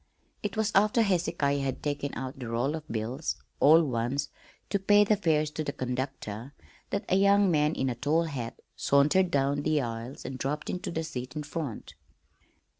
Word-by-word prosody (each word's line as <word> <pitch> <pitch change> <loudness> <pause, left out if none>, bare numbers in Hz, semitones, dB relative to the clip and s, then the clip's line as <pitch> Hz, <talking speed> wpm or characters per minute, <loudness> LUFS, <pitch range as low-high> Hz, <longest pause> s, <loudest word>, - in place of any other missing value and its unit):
It 205 0 -4
was 220 -1 +1
after 210 +4 +4
Hezekiah 165 -7 +1
had 135 -2 -3
taken 145 -1 -2
out 130 +2 -5
the 125 - -5
roll 120 +5 0
of 160 -1 -6
bills 120 +7 -3 0.2
all 160 +4 +7
ones 130 +1 -1 0.4
to 200 - +2
pay 205 +2 +5
the 210 +1 +3
fares 155 -6 +1
to 155 - -3
the 145 - -2
conductor 130 -2 -4 0.3
that 200 - -2
a - - +2
young 200 0 +5
man 150 0 +2
in 135 - 0
a 125 - 0
tall 145 +7 +1
hat 130 -8 -5 0.2
sauntered 150 +7 +3
down 140 -1 +1
the 155 0 +2
aisle 115 0 -4
and 130 -1 -5
dropped 150 +3 -2
into 180 - -4
the 160 -1 -2
seat 125 -5 -6
in 150 - -3
front. 145 -5 -5
145 Hz, 185 wpm, -29 LUFS, 130-170 Hz, 0.4 s, all